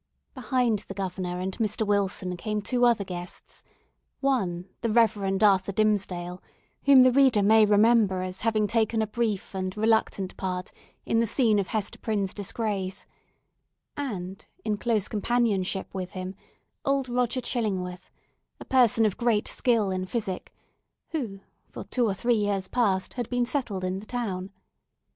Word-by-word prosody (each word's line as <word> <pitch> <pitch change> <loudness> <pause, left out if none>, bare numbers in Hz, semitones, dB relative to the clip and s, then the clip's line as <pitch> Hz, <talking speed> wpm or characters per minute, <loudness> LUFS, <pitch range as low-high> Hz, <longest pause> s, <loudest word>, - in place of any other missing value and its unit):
Behind 245 -4 0
the 195 - -7
Governor 185 -2 -3
and 185 +1 -3
Mr. 215 0 0
Wilson 195 -3 0
came 210 +4 -3
two 245 +3 +2
other 235 -4 +3
guests—one, 180 +2 -5 0.2
the 230 - 0
Reverend 215 -3 +2
Arthur 195 -2 +4
Dimmesdale, 185 -4 0 0.4
whom 275 -2 +8
the 255 - +6
reader 255 -5 +4
may 215 +1 +6
remember 205 -3 +4
as 185 0 -6
having 220 -1 +2
taken 220 +1 +1
a - - 0
brief 215 -3 -2
and 185 +1 -3
reluctant 220 -3 +1
part 185 -1 -3 0.3
in 225 - +1
the 230 - +2
scene 220 -2 +3
of 195 - -1
Hester 210 -2 -3
Prynne's 205 -4 -1
disgrace; 200 -2 -3 0.9
and, 195 -8 -5 0.2
in 210 -1 0
close 215 -2 0
companionship 210 -4 0
with 185 -2 -5
him, 185 0 -5 0.5
old 275 -1 +1
Roger 245 0 0
Chillingworth, 190 -7 -3 0.5
a - - -9
person 240 -4 +4
of 210 - 0
great 235 -3 +1
skill 225 -6 +1
in 185 0 -2
physic, 195 -4 -3 0.6
who 230 -12 -4 0.3
for - - -8
two 245 -3 0
or 195 - -1
three 240 +5 +1
years 205 -3 0
past 195 -5 0
had 245 -3 -4
been 245 -1 +1
settled 235 -8 -2
in 185 +1 -2
the 210 - -12
town. 195 -7 -3
210 Hz, 150 wpm, -27 LUFS, 190-235 Hz, 0.9 s, whom